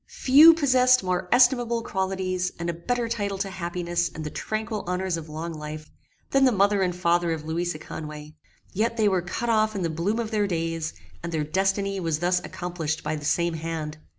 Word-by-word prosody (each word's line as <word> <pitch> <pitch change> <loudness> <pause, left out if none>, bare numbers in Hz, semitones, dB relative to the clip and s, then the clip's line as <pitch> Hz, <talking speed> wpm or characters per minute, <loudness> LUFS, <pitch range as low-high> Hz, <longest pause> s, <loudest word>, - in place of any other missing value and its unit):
Few 305 +5 +7
possessed 255 -5 +4
more 180 0 -1
estimable 245 -2 +4
qualities, 190 -2 -2
and 170 0 -2
a - - -8
better 235 +8 -2
title 205 -4 -2
to 195 0 -3
happiness 175 -1 -2
and 160 - -8
the 150 - -5
tranquil 215 -1 -3
honors 180 0 -1
of 165 -1 -7
long 160 +2 -5
life, 155 0 -8 0.4
than 275 0 +4
the 260 - +5
mother 200 -1 +3
and 180 -2 0
father 175 -1 +1
of 155 -1 -6
Louisa 170 +1 -2
Conway: 150 -1 -8 0.4
yet 230 +4 0
they 215 -2 +3
were 190 -3 +2
cut 180 +7 -4
off 215 -1 +2
in 190 - -2
the 165 - -1
bloom 175 +8 -1
of 230 -1 -3
their 210 -2 +1
days; 165 -2 -2 0.3
and 170 - -5
their 160 -2 -1
destiny 195 +4 0
was 165 -4 -1
thus 180 +2 +1
accomplished 170 -3 -4
by - - -2
the 150 -1 -7
same 170 +2 +1
hand. 160 -1 -5
180 Hz, 200 wpm, -25 LUFS, 165-215 Hz, 0.4 s, Few